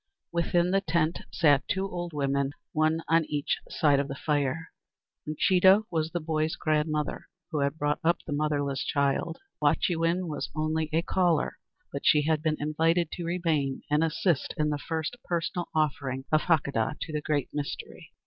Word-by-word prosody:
Within 170 +1 +1
the 195 +1 +3
tent 165 -2 0
sat 145 -7 +3
two 190 +1 0
old 175 -2 -5
women, 140 -1 0 0.2
one 155 +1 +2
on 165 0 +4
each 145 -1 -1
side 145 -3 +3
of 140 - -1
the 135 - -5
fire. 145 +2 -1 0.6
Uncheedah 190 +6 +5
was 160 -2 0
the 175 - -2
boy's 155 0 -1
grandmother, 155 -1 -1 0.2
who 155 - -1
had 140 +2 0
brought 145 -1 0
up 170 +1 +3
the 145 - -3
motherless 145 -2 0
child. 140 +3 0 0.2
Wahchewin 170 +1 +1
was 150 -3 -4
only 155 0 0
a 165 +1 +1
caller, 175 -4 +1 0.3
but 140 - -3
she 150 -1 +5
had 155 0 +1
been 155 -1 0
invited 160 +2 +1
to 175 - -5
remain 160 -6 0
and 150 +2 +3
assist 165 -1 0
in 150 0 +1
the 145 - -2
first 160 +8 -3
personal 175 0 -2
offering 135 -3 0
of 155 0 +4
Hakadah 140 -9 +1
to 155 - -5
the 150 - -1
"Great 145 -3 -1
Mystery." 145 -1 -6
155 Hz, 170 wpm, -28 LUFS, 145-165 Hz, 0.6 s, Uncheedah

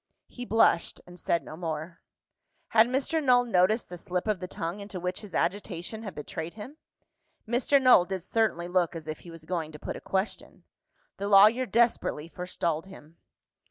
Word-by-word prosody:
He 245 - -8
blushed, 225 -7 +2
and 180 0 -13
said 170 +1 0
no - - -9
more. 160 0 -5 0.7
Had 225 0 +5
Mr. 275 +5 0
Null 250 -2 +4
noticed 215 +1 +2
the 180 -1 -9
slip 180 +3 -3
of 210 -4 0
the 180 - -5
tongue 170 +3 -5
into 200 -2 -7
which 180 +1 -3
his 210 -3 -9
agitation 195 +2 -2
had 200 -6 -7
betrayed 160 +3 -6
him? 250 +8 -9 0.7
Mr. 245 +4 +3
Null 255 -9 +6
did 190 -2 -4
certainly 200 -5 0
look 175 -2 +1
as 160 -2 -8
if 155 - -5
he 175 - -13
was 165 -1 -11
going 165 -3 -3
to - - -8
put - - -6
a - - -8
question. 190 +2 -3 0.5
The 200 - -3
lawyer 215 +6 +6
desperately 230 -10 +1
forestalled 170 -1 -3
him. 165 -4 -14
185 Hz, 180 wpm, -28 LUFS, 170-220 Hz, 0.7 s, Null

